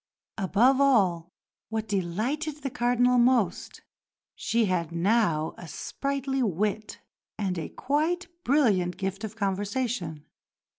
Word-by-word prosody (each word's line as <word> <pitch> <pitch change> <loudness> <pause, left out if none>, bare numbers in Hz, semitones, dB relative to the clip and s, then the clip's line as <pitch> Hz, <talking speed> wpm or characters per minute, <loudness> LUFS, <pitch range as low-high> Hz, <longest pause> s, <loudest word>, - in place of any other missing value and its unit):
Above 235 +8 +3
all, 220 -11 +4
and 165 - -12 0.5
what 220 0 -3
delighted 245 - -2
the 275 - -2
Cardinal 245 +1 +2
most, 240 -6 +1 0.5
she 230 +1 0
had 175 -4 -1
now 170 -3 +1
a 170 - -9
sprightly 275 - -3
wit, 210 +1 -1 0.4
and 195 -3 -1
a 160 - -5
quite 320 +6 -1 0.2
brilliant 210 -11 +2
gift 195 +1 -3
of 220 -1 -5
conversation. 200 - -2
220 Hz, 115 wpm, -27 LUFS, 185-260 Hz, 0.5 s, all